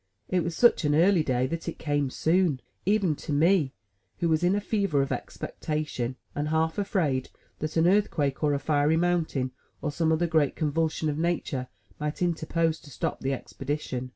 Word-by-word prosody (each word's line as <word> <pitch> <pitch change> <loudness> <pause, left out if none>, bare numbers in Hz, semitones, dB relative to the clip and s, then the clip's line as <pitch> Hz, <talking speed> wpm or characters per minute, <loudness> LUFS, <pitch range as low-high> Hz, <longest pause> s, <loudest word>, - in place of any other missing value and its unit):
It 180 -2 +1
was 170 0 -3
such 240 -2 +5
an 150 -1 +2
early 175 +2 +5
day 130 -4 +1
that 165 +5 -3
it - - -7
came 145 -3 0
soon, 160 0 +2 0.3
even 200 -6 +3
to - - -6
me, 155 -1 +3 0.5
who 170 - 0
was 160 +1 +2
in 180 +3 +3
a - - +2
fever 200 -9 +1
of 135 - -4
expectation, 150 -5 -3 0.2
and 145 +1 -2
half 160 +3 +1
afraid 160 -10 0 0.3
that 155 +2 -3
an 160 - +4
earthquake 165 -8 +2
or 145 -1 +3
a - - -1
fiery 145 +2 +2
mountain, 165 -7 0 0.3
or 150 - -2
some 160 +2 +1
other 160 +2 +2
great 160 -4 +2
convulsion 160 0 0
of 150 0 -1
nature 160 -6 -1 0.3
might 150 +3 -2
interpose 165 -1 0
to 145 - -15
stop 130 - -3
the 135 - -1
expedition. 135 -1 -4
155 Hz, 180 wpm, -27 LUFS, 145-170 Hz, 0.5 s, such